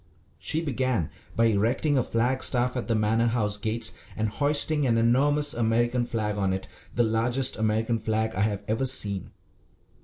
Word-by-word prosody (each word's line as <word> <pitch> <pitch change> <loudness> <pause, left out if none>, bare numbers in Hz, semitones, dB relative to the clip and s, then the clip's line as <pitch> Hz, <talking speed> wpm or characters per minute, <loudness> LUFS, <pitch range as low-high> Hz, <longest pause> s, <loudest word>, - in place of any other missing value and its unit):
She 160 +2 -2
began 130 - -1 0.2
by 115 - +3
erecting 115 +7 +1
a 130 - +3
flag 125 +3 0
staff 125 0 0
at 125 - -3
the 115 - +1
Manor 110 +2 +1
House 110 -3 0
gates 110 +2 -1 0.2
and 110 0 0
hoisting 145 +3 +2
an 115 -1 +2
enormous 145 +5 +3
American 120 +1 0
flag 105 -3 -2
on 95 -2 0
it, 95 0 -5 0.3
the 120 - +3
largest 120 +3 0
American 110 +1 0
flag 110 +1 -1
I 95 - -2
have 105 -1 -1
ever 115 +5 0
seen. 100 -7 -1
115 Hz, 165 wpm, -26 LUFS, 110-130 Hz, 0.3 s, by